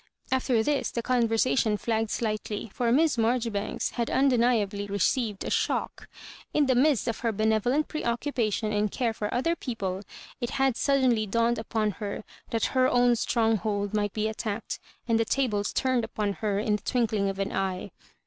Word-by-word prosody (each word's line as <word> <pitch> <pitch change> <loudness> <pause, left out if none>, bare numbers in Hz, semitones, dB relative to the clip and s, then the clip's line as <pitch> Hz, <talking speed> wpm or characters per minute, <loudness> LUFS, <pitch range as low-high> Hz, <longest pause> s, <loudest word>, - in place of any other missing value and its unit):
After 255 -3 +2
this 290 +3 0
the 235 - -3
conversation 230 -2 +2
flagged 225 0 -1
slightly, 215 -1 -3
for 240 -2 0
Miss 300 +1 +3
Maijori 230 +1 +1
banks 205 +1 -2
had 235 -2 -2
undeniably 235 -6 +2
received 205 +1 0
a - - -3
shock. - - -1 0.5
In 300 - +4
the 265 - +3
midst 255 -1 +3
of 230 - -2
her 230 -1 0
benevolent 220 +7 +1
preoccupation 235 -5 -1
and 210 0 +1
care 235 -3 0
for 210 -1 -3
other 305 +8 +1
people, 195 - -4 0.4
it 240 -2 -2
had 270 -2 +1
suddenly 255 -6 +2
dawned 230 +2 +1
upon 220 -1 -1
her 205 +1 -4 0.3
that 225 -1 0
her 255 -1 +4
own 245 -1 +4
stronghold 220 -3 0
might 205 -1 0
be 215 0 0
attacked, 220 0 -4 0.3
and 230 -1 +2
the - - +4
tables 215 -6 0
turned 255 -2 +1
upon 210 -2 -2
her 205 -2 0
in 210 0 +1
the - - -19
twinkling 220 -5 0
of 195 - -4
an 195 0 -2
eye. 190 -1 -2
225 Hz, 170 wpm, -27 LUFS, 210-250 Hz, 0.5 s, In